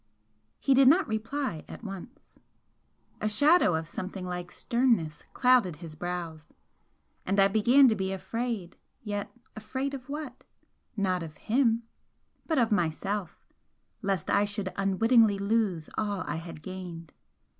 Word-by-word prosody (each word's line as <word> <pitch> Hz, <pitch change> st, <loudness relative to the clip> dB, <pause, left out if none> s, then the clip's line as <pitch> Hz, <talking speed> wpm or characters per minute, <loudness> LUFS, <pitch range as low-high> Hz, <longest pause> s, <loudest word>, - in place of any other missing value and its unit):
He 275 Hz, -, +3 dB
did 265 Hz, 0 st, +6 dB
not 340 Hz, +8 st, +5 dB
reply 225 Hz, -, -3 dB
at -, -, -10 dB
once. 200 Hz, +5 st, -9 dB, 0.9 s
A 215 Hz, -, +1 dB
shadow 290 Hz, -, +4 dB
of 160 Hz, 0 st, -3 dB
something 185 Hz, +2 st, -6 dB
like 180 Hz, -1 st, -5 dB
sternness 230 Hz, -, +1 dB
clouded 250 Hz, -, +4 dB
his 165 Hz, 0 st, -10 dB
brows, 165 Hz, -2 st, -6 dB, 0.7 s
and 195 Hz, +2 st, 0 dB
I 195 Hz, -, +7 dB
began 240 Hz, +7 st, +5 dB
to 230 Hz, -, +4 dB
be 190 Hz, -1 st, -2 dB
afraid 195 Hz, 0 st, -4 dB, 0.3 s
yet 205 Hz, -2 st, -4 dB, 0.2 s
afraid 260 Hz, +6 st, -3 dB
of 265 Hz, -1 st, -8 dB
what? 290 Hz, -3 st, -6 dB, 0.5 s
Not 185 Hz, -3 st, +1 dB
of 155 Hz, -2 st, -8 dB
him 230 Hz, -1 st, +1 dB, 0.6 s
but 320 Hz, -, +1 dB
of 235 Hz, -3 st, +3 dB
myself, 190 Hz, +1 st, -1 dB, 0.6 s
lest 195 Hz, -6 st, -1 dB
I 200 Hz, -, +4 dB
should 205 Hz, -2 st, -3 dB
unwittingly 210 Hz, +2 st, +4 dB
lose 200 Hz, -5 st, 0 dB
all 205 Hz, -3 st, -1 dB
I -, -, -3 dB
had 165 Hz, -2 st, -9 dB
gained. 175 Hz, -4 st, -8 dB
200 Hz, 135 wpm, -28 LUFS, 180-240 Hz, 0.9 s, I